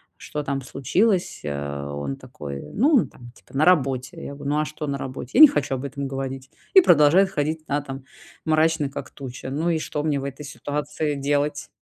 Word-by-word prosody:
что 150 -1 -5
там 140 -1 -2
случилось, 175 - 0
э?" 70 -1 -4
Он 70 -1 -4
такой: 70 -2 -8
"Ну, 275 +3 +4
там, 120 -1 -13
типа, 135 - -11
на 155 - +4
работе". 135 -7 +2
Я 140 - -6
говорю: 140 0 -4
"Ну, 150 - +2
а 155 - +1
что 150 0 -6
на 140 - -1
работе?" 130 -1 -6
"Я - - +8
не 310 - +13
хочу 135 - -1
об 130 - -5
этом 140 0 -4
говорить". 135 0 -5 0.2
И 380 - +10
продолжает 175 - +5
ходить, 155 +1 -2
да, 145 +1 0
там, 135 -1 -8 0.4
мрачный, 155 -2 +2
как - - -7
туча. 130 -1 -8
Ну 155 +5 -1
и 160 -2 +1
что 150 -1 -3
мне 150 -3 +1
в - - -6
этой 140 +1 -6
ситуации 150 0 -3
делать? 145 +1 -1
145 Hz, 205 wpm, -24 LUFS, 135-155 Hz, 0.4 s, не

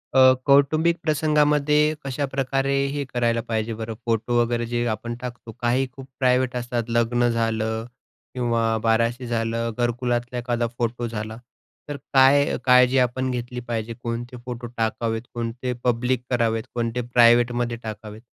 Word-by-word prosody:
अ, 130 - +6 0.3
कौटुंबिक 155 +5 +4
प्रसंगामध्ये 150 0 +2
कशाप्रकारे, 135 0 -1 0.2
हे 145 0 -2
करायला 120 -2 0
पाहिजे 110 0 -1
बरं? 110 0 -5
फोटो 115 +1 0
वगैरे 120 0 0
जे 120 +1 -1
आपण 120 +2 -3
टाकतो. 125 -2 -7
काही 125 +2 +1
खूप 135 -1 -10
प्रायव्हेट 125 -1 +2
असतात, 120 -1 -2
लग्न 120 +1 +2
झालं 115 -1 -1 0.5
किंवा 115 -2 0
बाराशे 115 +2 +1
झालं, 115 0 -1
घरकुलातला 120 0 -1
एखादा 120 -1 -1
फोटो 120 0 -2
झाला. 110 0 -5 0.5
तर 145 - -4 0.2
काय, 140 +1 +5
काळजी 125 +1 +5
आपण 130 +1 0
घेतली 125 0 -4
पाहिजे, 115 -1 -3
कोणते 120 +1 -4
फोटो 120 -1 -6
टाकावेत, 115 0 -1
कोणते 120 +2 -3
पब्लिक 125 +1 0
करावेत, 115 -2 +1
कोणते 120 0 -1
प्रायवेटमध्ये 120 0 +4
टाकावेत? 110 0 -8
120 Hz, 135 wpm, -23 LUFS, 115-130 Hz, 0.5 s, अ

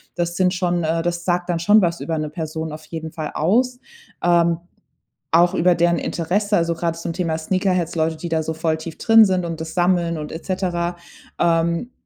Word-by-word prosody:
Das 175 0 -2
sind 185 -1 +2
schon 175 -2 0
äh, 165 +1 0
das 175 0 -3
sagt 175 0 0
dann 170 -1 0
schon 205 +5 +5
was 170 -2 0
über 165 -1 -2
'ne 155 -1 -2
Person 160 0 -5
auf 155 0 -9
jeden 160 0 -6
Fall 155 -2 -5
aus. 245 +10 +1 0.4
Ähm, 170 -1 +3 0.7
auch 175 +2 +4
über 180 +1 +3
deren 170 0 +2
Interesse, 205 +5 0
also, 170 0 +1
gerade 165 0 -2
zum 165 0 -4
Thema 165 -2 -1
Sneakerheads, 185 0 0
Leute, 160 0 0
die 170 - -6
da 160 -1 +1
so 160 - -3
voll 160 0 0
tief 160 0 -8
drin 225 -1 +6
sind 185 -2 0
und 165 -1 -5
das 160 0 -6
sammeln 175 -2 +1
und 150 -1 -6
et 165 - -7
cetera. 175 -2 -2 0.4
Ähm, 170 +6 +1
170 Hz, 205 wpm, -21 LUFS, 160-180 Hz, 0.7 s, drin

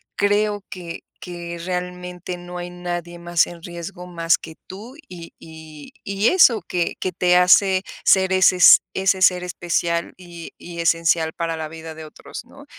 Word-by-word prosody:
creo 205 0 0
que 175 -2 -8 0.2
que, 170 -1 -7
realmente, 180 0 -5
no 175 0 -9
hay 175 - -6
nadie 175 -1 -6
más 170 -1 +1
en 170 -1 -12
riesgo, 175 +1 -8
más 165 -1 +1
que 160 -1 -12
tú, 220 +8 -10
y 170 -2 -11
y 160 -2 -13
y 200 +3 +1
eso, 255 - +5
que 175 -1 -2
que 185 - -2
te 180 0 +2
hace 185 +1 +4 0.2
ser 190 -1 +4
ese 185 0 +4
s 180 - +9 0.2
ese 190 0 +1
ser 180 -1 +4
especial, 170 -1 -2
y 175 -2 -11
y 170 -1 -10
esencial 165 -1 +1
para 165 -1 -3
la 155 -1 -5
vida 160 0 -9
de 160 -1 -9
otros, 155 - -11
¿no? - - -16
175 Hz, 170 wpm, -21 LUFS, 170-185 Hz, 0.2 s, s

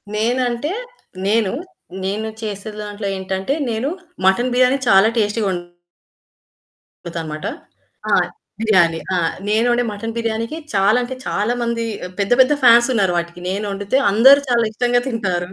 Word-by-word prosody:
నేనంటే 245 +6 0 0.6
నేను 215 -2 +2 0.5
నేను 210 +3 -2
చేసే 210 0 -5
దాంట్లో 205 -1 -5
ఏంటంటే 190 +6 -2 0.2
నేను 230 +5 -1 0.4
మటన్ 240 +7 +3
బిర్యానీ 255 +2 +4
చాలా 195 +1 +6
టేస్టీగా 210 0 +1
వండుతాను 175 -1 -8 1.4
మాట 155 - -6 0.7
ఆ! - - +4 0.5
బిర్యానీ. 175 -7 +3 0.2
ఆ! - - +1 0.3
నేను 225 +3 +2
ఒండే 240 0 +2
మటన్ 225 +2 -5
బిర్యానీకి 230 +5 -2 0.2
చాలా 200 +4 +3
అంటే 260 +1 -5
చాలామంది 235 +2 -1 0.4
పెద్ద 200 +3 -1
పెద్ద 260 +3 +4
ఫ్యాన్స్ 240 0 +7
ఉన్నారు 195 -5 +2
వాటికి. 170 +1 -4
నేనొండితే 200 +4 -1
అందరూ 265 +7 +7
చాలా 235 -1 +3
ఇష్టంగా 245 +2 +1
తింటారు. 185 -7 -2
220 Hz, 130 wpm, -19 LUFS, 195-240 Hz, 1.4 s, ఫ్యాన్స్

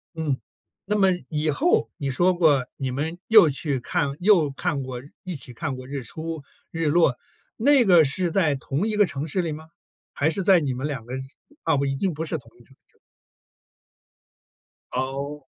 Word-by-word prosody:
嗯。 155 -5 -1 0.5
那 210 - +2
么 195 -2 +4 0.2
以 155 0 -1
后 310 - +2
你 140 - -3
说 175 +7 +3
过 155 -7 +3
你 135 -2 -2
们 155 +6 -3
又 215 -7 +8
去 145 0 -2
看 140 +3 -1
又 180 -6 +5
看 145 0 -2
过 130 -2 -6 0.2
一 185 -2 -5
起 130 -3 -6
看 140 +2 -3
过 130 0 -9
日 140 0 -4
出 160 +6 -6 0.3
日 165 -1 -1
落， 150 -4 +3 0.4
那 275 +2 +5
个 175 -7 +6
是 170 +5 -1
在 160 -6 +2
同 140 +8 -2
一 215 - -1
个 210 -1 +5
城 145 -3 -4
市 180 +4 0
里 165 -2 -2
吗？ 160 +1 -8 0.4
还 145 - +1
是 190 +4 -2
在 185 -1 +6
你 140 -3 -1
们 130 +4 -3
2 135 -6 -5
个 125 - -8 0.5
啊， - - +2
已 135 - -1
经 185 +3 0
不 160 +2 -4
是 160 - -2
同 120 -6 -15
一 120 - -19
城 135 - -23
市。 - - -34 2.0
哦。 140 +3 -3
150 Hz, 195 characters per minute, -24 LUFS, 135-175 Hz, 2.0 s, 又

